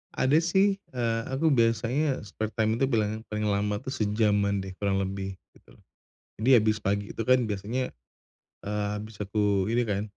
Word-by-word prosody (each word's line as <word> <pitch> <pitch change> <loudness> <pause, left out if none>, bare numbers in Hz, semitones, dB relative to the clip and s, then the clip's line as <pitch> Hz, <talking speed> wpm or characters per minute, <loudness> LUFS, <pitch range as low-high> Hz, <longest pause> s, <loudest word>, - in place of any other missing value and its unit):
ada 135 +4 +3
sih, 195 +4 +2
eee, 115 -2 0
aku 145 +4 +1
biasanya 120 +3 +1
spare 110 +2 -5
time 110 0 +1
itu 135 - +4
bilangnya 110 -3 0
paling 105 0 -2
lama 105 +1 0
tuh 130 - -5
sejaman 105 -4 +1
deh 95 - -7
kurang 100 -1 +1
lebih, 95 0 -4 0.2
gitu - - -21
loh. - - -24 0.6
Jadi, 125 - +2
habis 110 0 +1
pagi 100 +1 -1
itu - - -3
kan 130 0 +4
biasanya, 110 +5 -3 0.7
eee, 105 0 -1
habis 110 0 -10
aku 100 0 +1
ini 120 +1 +3
kan, 100 0 0
110 Hz, 170 wpm, -27 LUFS, 100-125 Hz, 0.7 s, itu